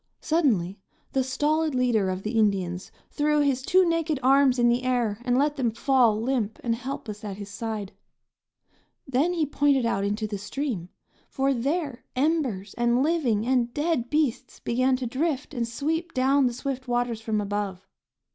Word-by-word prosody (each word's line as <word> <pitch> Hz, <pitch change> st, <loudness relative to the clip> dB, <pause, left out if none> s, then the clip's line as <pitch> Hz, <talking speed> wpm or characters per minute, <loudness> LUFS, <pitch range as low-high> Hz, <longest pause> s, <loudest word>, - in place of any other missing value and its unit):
Suddenly 215 Hz, -, +1 dB, 0.3 s
the 265 Hz, -, +1 dB
stolid 300 Hz, +3 st, 0 dB
leader 235 Hz, -6 st, +2 dB
of 185 Hz, +1 st, -3 dB
the 215 Hz, -, -2 dB
Indians 195 Hz, -5 st, 0 dB, 0.2 s
threw 300 Hz, 0 st, +2 dB
his 275 Hz, -3 st, +1 dB
two 370 Hz, +6 st, +3 dB
naked 330 Hz, -3 st, 0 dB
arms 270 Hz, 0 st, +5 dB
in 240 Hz, -1 st, +4 dB
the 240 Hz, +1 st, +2 dB
air 240 Hz, -5 st, 0 dB
and 245 Hz, 0 st, +1 dB
let 295 Hz, +2 st, +1 dB
them 250 Hz, -3 st, +1 dB
fall, 235 Hz, -2 st, +2 dB
limp 230 Hz, -3 st, -1 dB
and 235 Hz, -, +1 dB
helpless 230 Hz, -3 st, -6 dB
at 200 Hz, -2 st, -5 dB
his 200 Hz, -1 st, -8 dB
side; 215 Hz, -2 st, -4 dB, 1.2 s
then 275 Hz, +7 st, +1 dB
he 330 Hz, -3 st, +1 dB
pointed 285 Hz, -3 st, +2 dB
out 195 Hz, -4 st, 0 dB
into 210 Hz, +2 st, -1 dB
the 205 Hz, -2 st, -4 dB
stream, 205 Hz, -, -4 dB, 0.4 s
for 270 Hz, +1 st, +1 dB
there 275 Hz, +1 st, -2 dB
embers 255 Hz, -, 0 dB
and 240 Hz, +2 st, +3 dB
living 275 Hz, -10 st, +1 dB
and 245 Hz, -2 st, +1 dB
dead 295 Hz, -6 st, 0 dB
beasts 280 Hz, -5 st, -1 dB
began 255 Hz, +2 st, +1 dB
to 255 Hz, 0 st, -4 dB
drift 280 Hz, +4 st, -2 dB
and 240 Hz, -3 st, -1 dB
sweep 320 Hz, +8 st, -3 dB
down 265 Hz, +1 st, +3 dB
the 245 Hz, -, -2 dB
swift 260 Hz, +1 st, -4 dB
waters 240 Hz, -2 st, -1 dB
from 220 Hz, -1 st, -1 dB
above. 200 Hz, -2 st, -3 dB
250 Hz, 165 wpm, -26 LUFS, 220-280 Hz, 1.2 s, arms